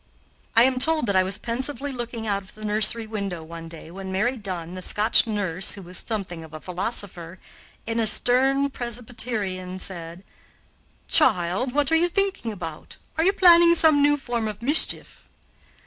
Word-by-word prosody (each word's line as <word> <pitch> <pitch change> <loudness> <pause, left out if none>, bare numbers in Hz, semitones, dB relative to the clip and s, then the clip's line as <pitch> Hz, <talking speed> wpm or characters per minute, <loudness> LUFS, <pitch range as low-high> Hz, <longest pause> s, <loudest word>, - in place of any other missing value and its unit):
I 230 - +7
am 255 0 +2
told 315 +1 +2
that 200 - 0
I 185 - +5
was 190 +1 -1
pensively 265 +4 -3
looking 240 -3 -5
out 200 -2 -1
of 190 - -17
the 215 0 -9
nursery 215 +2 +3
window 200 -6 -5
one 165 +1 -9
day, 165 0 -11
when 190 +1 -7
Mary 225 +7 0
Dunn, 180 -6 -6
the 185 - -7
Scotch 210 +5 +4
nurse, 195 -4 -2
who 200 - -9
was 180 +1 -6
something 190 -7 -5
of 160 -1 -12
a - - -7
philosopher, 180 -1 -3 0.5
and 230 0 -1
a 220 - +2
stern 270 +5 +2
Presbyterian, 220 -7 -4
said: 175 -1 -7 0.8
"Child, 240 - +2
what 290 -1 +2
are - - +4
you 345 +2 +3
thinking 385 - -1
about; 165 -6 -8 0.2
are 320 - +1
you 380 - +4
planning 345 -3 +7
some 315 -3 +5
new 290 +1 +3
form 240 -5 -3
of 215 +1 -7
mischief?" 290 +5 0
220 Hz, 175 wpm, -24 LUFS, 185-260 Hz, 0.8 s, I